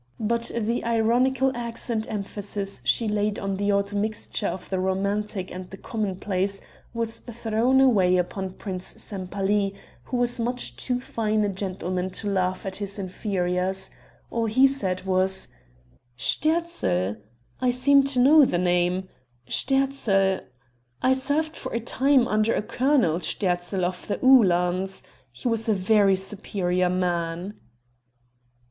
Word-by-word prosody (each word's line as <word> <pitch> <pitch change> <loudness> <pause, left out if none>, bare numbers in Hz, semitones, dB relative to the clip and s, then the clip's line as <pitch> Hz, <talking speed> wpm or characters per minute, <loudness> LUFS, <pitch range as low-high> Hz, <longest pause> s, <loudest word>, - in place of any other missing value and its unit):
But 235 +1 0
the 230 +2 -1
ironical 245 +4 +2
accent 230 -1 -2
emphasis 200 -1 -3
she 230 - +2
laid 210 0 0
on 195 -1 -3
the 205 +1 +1
odd 200 0 0
mixture 210 0 -1
of 185 - -5
the 190 - -2
romantic 195 +1 -1
and 180 0 -7
the 195 - -9
commonplace 195 -2 -2 0.3
was 230 -1 -1
thrown 235 +2 0
away 195 -9 +4
upon 185 +1 -3
Prince 185 -3 -5
Sempaly, 195 0 -1 0.3
who 250 - -3
was 245 0 +1
much 245 +2 -1
too 250 -1 -1
fine 215 -3 -1
a 205 - +1
gentleman 185 -1 -3
to 205 +3 -3
laugh 185 -2 -1
at 190 -1 -2
his 200 -1 -4
inferiors; 185 -1 -1 0.4
all 230 -1 0
he 260 +5 +5
said 195 -10 0
was: 190 0 +1 0.7
"Sterzl? 120 - 0 0.4
I 255 - +2
seem 275 +3 +4
to 275 -2 +1
know 290 +4 +7
the 215 - +2
name. 180 +1 +1 0.4
Sterzl 250 -8 +1 0.6
I 260 - +5
served 290 +4 0
for 260 - -6
a - - +1
time 260 +2 +2
under 215 +1 +2
a - - -1
Colonel 245 - +2
Sterzl 180 0 -1
of 180 0 -4
the 205 - -1
Uhlans. 190 -6 +4 0.3
He 125 - -5
was 225 -1 +1
a - - +4
very 195 0 +4
superior 185 -2 -1
man." 175 +1 -2
205 Hz, 135 wpm, -25 LUFS, 185-235 Hz, 0.7 s, know